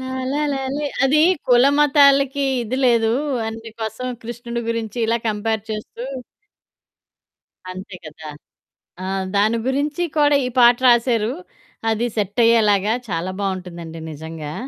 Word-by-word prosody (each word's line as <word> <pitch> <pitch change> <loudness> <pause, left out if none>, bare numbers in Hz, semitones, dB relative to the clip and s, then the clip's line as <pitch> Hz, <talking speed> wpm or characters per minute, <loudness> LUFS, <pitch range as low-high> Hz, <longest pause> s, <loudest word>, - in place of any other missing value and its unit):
లాలలాలాలె 270 +2 -2 0.2
అది 295 +3 +4 0.3
కులమతాలకి 280 +1 +4 0.2
ఇది 240 +3 -3
లేదు. 230 -2 +3 0.4
అందు 225 0 -8
కోసం 220 +3 -4 0.2
కృష్ణుడి 235 +1 -5
గురించి 230 0 -3
ఇలా 230 +1 +2
కంపేర్ 215 0 -1
చేస్తూ 215 +2 -6 1.7
అంతే 185 +1 -9
కదా! 155 0 -10 0.7
ఆ! - - -4 0.3
దాని 215 +3 +3
గురించి 290 +5 -1 0.2
కూడా 290 -1 +4
ఈ - - -3
పాట 240 0 +6
రాశారు. 235 -1 +3 0.6
అది 230 +2 0
సెట్ 205 +2 -2
అయ్యేలాగా 215 -2 +3 0.2
చాలా 175 +2 -2
బావుంటుందండి 175 -4 -5
నిజంగా. 155 0 -7
230 Hz, 110 wpm, -20 LUFS, 205-265 Hz, 1.7 s, పాట